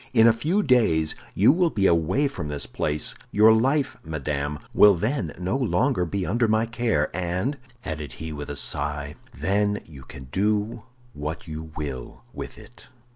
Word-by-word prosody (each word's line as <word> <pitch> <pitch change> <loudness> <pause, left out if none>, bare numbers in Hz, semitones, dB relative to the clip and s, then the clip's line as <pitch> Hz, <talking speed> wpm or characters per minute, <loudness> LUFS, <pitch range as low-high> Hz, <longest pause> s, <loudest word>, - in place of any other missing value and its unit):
In 115 -1 +7
a 115 - +7
few 160 - 0
days 85 - +3 0.2
you 105 +7 +6
will 175 +2 +2
be 100 -9 0
away 85 - +3
from 135 - -5
this 75 -1 -3
place; 75 0 -2 0.2
your 110 +2 +6
life, 135 +5 +1
madame, 75 -2 -3 0.2
will 105 -2 +7
then 105 - -1
no 90 +6 -2
longer 130 -4 +1
be 95 +2 -2
under 120 +1 +1
my 110 +1 +2
care, 115 -11 0
and," 95 +11 -2 0.3
added 75 -4 -5
he, 80 -1 -6
with 75 -1 -6
a 70 - -4
sigh, 75 +1 0 0.2
"then 100 +8 0
you 70 -4 -12
can 65 +1 -10
do 105 +3 0 0.3
what 75 +4 -5
you 80 0 -7
will 70 -5 -6
with - - -7
it." 120 - -15
95 Hz, 170 wpm, -25 LUFS, 75-115 Hz, 0.3 s, In